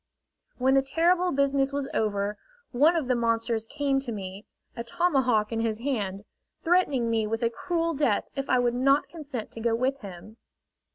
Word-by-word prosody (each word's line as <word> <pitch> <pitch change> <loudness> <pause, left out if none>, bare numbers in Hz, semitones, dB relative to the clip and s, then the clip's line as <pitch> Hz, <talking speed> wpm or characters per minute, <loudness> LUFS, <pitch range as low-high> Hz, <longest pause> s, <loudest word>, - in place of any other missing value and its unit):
When 260 +1 +3
the 270 - +5
terrible 345 +6 +2
business 275 0 +1
was 280 -1 -2
over, 205 -1 0 0.4
one 295 +7 +4
of 315 -6 -1
the 250 - +2
monsters 230 -1 0
came 280 0 0
to 270 -3 -5
me, 195 -1 -7 0.3
a 235 - -4
tomahawk 255 -9 +1
in 225 - -1
his 225 -1 -1
hand, 210 -7 -3 0.4
threatening 325 -9 +2
me 225 -2 0
with 225 +2 -2
a 230 - +2
cruel 335 +6 -1
death 270 -8 +1
if 275 0 -4
I 255 - +4
would 245 -1 +2
not 275 +3 +2
consent 280 -9 -7
to - - -9
go 225 0 +1
with 260 +3 -1
them. 200 +2 -10
250 Hz, 180 wpm, -27 LUFS, 225-280 Hz, 0.4 s, the